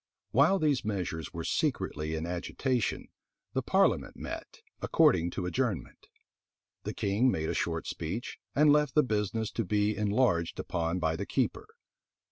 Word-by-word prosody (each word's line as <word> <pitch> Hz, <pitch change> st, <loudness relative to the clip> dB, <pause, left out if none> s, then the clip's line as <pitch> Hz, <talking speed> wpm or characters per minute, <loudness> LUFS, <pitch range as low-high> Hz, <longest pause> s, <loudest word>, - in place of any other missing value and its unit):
While 145 Hz, -, +5 dB
these 150 Hz, -7 st, +1 dB
measures 90 Hz, -6 st, -3 dB
were -, -, -5 dB
secretly 75 Hz, +1 st, -1 dB
in 80 Hz, +1 st, -3 dB
agitation, 110 Hz, +7 st, -2 dB, 0.4 s
the 130 Hz, -, +1 dB
parliament 190 Hz, +9 st, +2 dB
met, -, -, -7 dB, 0.2 s
according 90 Hz, -, +4 dB
to 90 Hz, +1 st, -4 dB
adjournment. 110 Hz, 0 st, -2 dB, 0.8 s
The -, -, -3 dB
king 105 Hz, +6 st, +2 dB
made 80 Hz, -8 st, -1 dB
a -, -, 0 dB
short -, -, -1 dB
speech, 85 Hz, +9 st, -4 dB, 0.2 s
and 150 Hz, 0 st, +6 dB
left 150 Hz, -2 st, +2 dB
the 150 Hz, -, +6 dB
business 110 Hz, -2 st, -1 dB
to 115 Hz, -, -1 dB
be 105 Hz, +2 st, +1 dB
enlarged 105 Hz, -5 st, +1 dB
upon 85 Hz, +1 st, -1 dB
by 80 Hz, -2 st, 0 dB
the -, -, -4 dB
keeper. -, -, -1 dB
105 Hz, 145 wpm, -30 LUFS, 85-130 Hz, 0.8 s, and